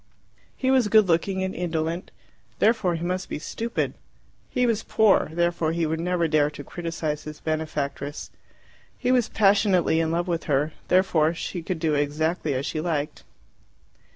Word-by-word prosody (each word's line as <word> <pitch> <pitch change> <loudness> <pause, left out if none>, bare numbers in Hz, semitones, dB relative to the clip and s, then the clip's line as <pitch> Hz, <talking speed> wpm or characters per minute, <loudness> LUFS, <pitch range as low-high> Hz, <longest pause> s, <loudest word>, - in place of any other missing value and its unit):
He 260 0 +1
was 260 -4 +4
good 215 -1 +5
looking 190 +3 +1
and 190 - -2
indolent; 165 0 -2 0.5
therefore 215 -6 +2
he 165 - -4
must 185 +1 -2
be - - -3
stupid. 230 +9 -3 0.6
He 250 - +1
was 225 -2 +1
poor; 220 -7 +3
therefore 170 -1 0
he 170 -1 0
would 160 +1 -1
never 175 0 +1
dare 150 -2 +3
to 145 -1 -9
criticize 165 -2 -4
his 155 0 -8
benefactress. 150 -2 -3 0.7
He 250 - 0
was 250 -3 +3
passionately 195 -5 +3
in 165 -1 +1
love 170 +2 -1
with 170 -2 -2
her; 145 +1 +1
therefore 170 -3 +3
she 175 +1 -4
could 175 +2 -3
do 160 -1 0
exactly 150 +1 0
as 130 +2 -2
she 155 - -2
liked. 155 -3 -2
170 Hz, 160 wpm, -25 LUFS, 155-190 Hz, 0.7 s, good